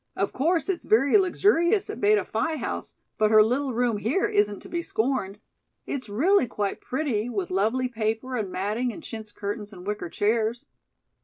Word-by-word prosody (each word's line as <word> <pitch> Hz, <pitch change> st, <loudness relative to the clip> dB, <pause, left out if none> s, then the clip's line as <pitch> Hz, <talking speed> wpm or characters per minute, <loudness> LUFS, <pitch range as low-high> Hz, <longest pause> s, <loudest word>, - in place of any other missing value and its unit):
Of -, -, -1 dB
course, 330 Hz, +5 st, +1 dB
it's 380 Hz, -3 st, -2 dB
very 265 Hz, -, +3 dB
luxurious 375 Hz, 0 st, +2 dB
at 245 Hz, -, -6 dB
Beta 205 Hz, -2 st, +4 dB
Phi 315 Hz, +9 st, -1 dB
House, -, -, -5 dB, 0.2 s
but 215 Hz, -1 st, +4 dB
her 215 Hz, 0 st, +7 dB
little 260 Hz, +5 st, 0 dB
room 240 Hz, -2 st, +1 dB
here 235 Hz, -, 0 dB
isn't 205 Hz, -1 st, +1 dB
to -, -, -11 dB
be 340 Hz, -, -2 dB
scorned. 220 Hz, -, -1 dB, 0.5 s
It's 255 Hz, -6 st, -4 dB
really 295 Hz, -, +3 dB
quite 205 Hz, -3 st, -3 dB
pretty, 250 Hz, -5 st, -1 dB
with 370 Hz, +8 st, -3 dB
lovely 255 Hz, -, +1 dB
paper 225 Hz, +2 st, -2 dB
and 210 Hz, -6 st, -2 dB
matting 215 Hz, +7 st, -1 dB
and 325 Hz, -, -10 dB
chintz 220 Hz, -2 st, -7 dB
curtains 205 Hz, +1 st, -5 dB
and 180 Hz, -2 st, -11 dB
wicker 210 Hz, -4 st, -3 dB
chairs." 225 Hz, +6 st, 0 dB
235 Hz, 175 wpm, -26 LUFS, 210-285 Hz, 0.5 s, her